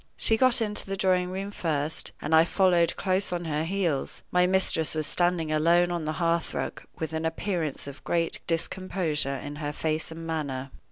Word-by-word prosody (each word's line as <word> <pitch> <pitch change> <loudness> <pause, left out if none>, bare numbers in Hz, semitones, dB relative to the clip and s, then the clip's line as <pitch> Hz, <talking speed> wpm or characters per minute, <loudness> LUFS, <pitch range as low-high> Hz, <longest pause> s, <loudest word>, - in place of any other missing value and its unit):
She 225 - +3
got 255 0 +5
into 210 -2 -3
the 195 0 -3
drawing 185 -1 +2
room 195 +2 -4
first, 155 -4 -2
and 150 - -1
I 160 0 +8
followed 175 -2 +3
close 190 0 +1
on 175 -1 -2
her 155 0 -1
heels. 170 -6 -1
My 180 0 +4
mistress 180 -4 +2
was 155 -1 -1
standing 175 -2 +1
alone 170 +3 +3
on 170 -2 -2
the 155 - -1
hearth 170 -1 0
rug, - - -3 0.2
with 160 -1 -4
an 160 0 -2
appearance 160 -2 -2
of 140 0 -10
great 165 -1 0
discomposure 165 -4 -1
in 145 +2 -6
her 145 -1 -3
face 155 +1 -2
and 165 0 -7
manner. 140 -5 -3
165 Hz, 185 wpm, -27 LUFS, 155-185 Hz, 0.2 s, I